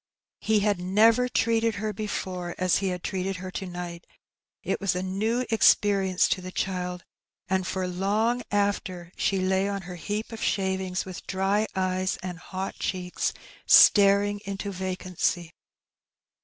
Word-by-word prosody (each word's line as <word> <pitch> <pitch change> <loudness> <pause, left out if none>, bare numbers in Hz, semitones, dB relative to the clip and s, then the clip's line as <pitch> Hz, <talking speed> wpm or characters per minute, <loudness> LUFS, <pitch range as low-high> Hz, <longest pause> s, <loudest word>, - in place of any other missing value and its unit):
He 215 -1 +2
had 205 -2 +1
never 220 +7 +4
treated 230 -1 +1
her 215 +2 -3
before 185 -5 -4
as 185 -1 +2
he 195 - -1
had 180 -1 -3
treated 190 0 -2
her 185 0 -7
to 190 - -5
night; 175 -1 -7 0.6
it - - -2
was 195 -3 +1
a 180 - -2
new 220 +7 -1
experience 195 -4 +4
to 185 - 0
the 185 0 -7
child, 180 -1 -3 0.4
and 190 -1 0
for 185 0 -2
long 210 +7 0
after 195 -4 -1
she 195 - 0
lay 190 +1 +1
on 200 -1 -3
her 180 0 -8
heap 205 +7 -4
of 225 - -7
shavings 190 -1 -1
with 185 -2 -9
dry 195 +3 +1
eyes 185 0 0
and 180 -2 -5
hot 190 +1 -6
cheeks, 180 -1 -2 0.4
staring 205 0 +6
into 200 0 -4
vacancy. 185 -2 -2
190 Hz, 150 wpm, -26 LUFS, 185-205 Hz, 0.6 s, staring